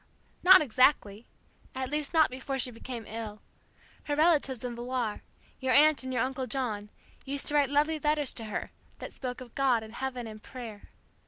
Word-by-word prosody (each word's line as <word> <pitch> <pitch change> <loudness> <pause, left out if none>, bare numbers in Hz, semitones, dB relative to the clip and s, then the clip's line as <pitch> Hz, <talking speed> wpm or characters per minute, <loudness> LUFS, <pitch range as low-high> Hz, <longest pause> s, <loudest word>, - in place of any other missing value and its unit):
'" - - -36
"Not 370 -1 +9
exactly 240 -4 +2 0.5
at 260 0 -3
least, 300 -1 -2
not 315 -5 +4
before 265 +1 -4
she 250 -1 +1
became 235 0 -7
ill. 215 -1 -7 0.6
Her 290 - -1
relatives 295 -6 +2
in 245 -1 -4
Villar 240 -2 -3 0.4
your 260 -1 +1
Aunt 305 +1 +6
and 260 0 -5
your 250 -3 +1
Uncle 260 0 -3
John 220 -7 -3 0.3
used 280 +1 -2
to - - -3
write 290 -2 +3
lovely 300 +2 +1
letters 295 -2 +1
to 225 - -5
her, 215 - -4 0.3
that - - -8
spoke 250 -1 -6
of 245 -2 -11
God 255 -5 +2
and 220 0 -11
heaven 255 -1 -4
and 215 -1 -9
prayer. 230 -5 -10
260 Hz, 185 wpm, -29 LUFS, 230-285 Hz, 0.6 s, Not